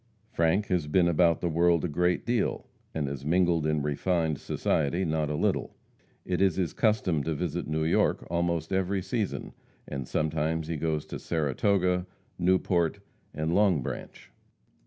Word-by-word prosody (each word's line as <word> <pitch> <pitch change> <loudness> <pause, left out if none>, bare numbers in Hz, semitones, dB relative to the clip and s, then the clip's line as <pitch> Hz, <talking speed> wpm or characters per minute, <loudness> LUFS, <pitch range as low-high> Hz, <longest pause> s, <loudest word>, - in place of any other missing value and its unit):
Frank 85 +5 +2
has 90 -6 0
been 85 +3 +3
about 85 -1 +3
the 90 - 0
world 85 +1 +3
a - - +1
great 90 +3 0
deal, 120 -3 0 0.3
and 75 -3 -2
has 70 -1 -5
mingled 85 0 +2
in 75 -2 0
refined 80 +1 0
society 80 +5 0
not 80 -2 0
a 75 - -1
little. - - -1 0.5
It 90 0 -1
is 95 -4 +3
his 90 -4 -1
custom 105 - +1
to 80 +1 -2
visit 85 +2 -3
New 80 0 -1
York 80 - +1
almost 85 0 -1
every 95 0 0
season, 110 -2 -3 0.3
and 65 -3 -5
sometimes 80 +1 -1
he 85 - -1
goes 75 0 -1
to - - -7
Saratoga, 90 +4 +1 0.3
Newport 90 -2 +2 0.3
and 80 +2 -2
Long 95 -8 +3
Branch. - - -7
85 Hz, 155 wpm, -28 LUFS, 75-90 Hz, 0.5 s, been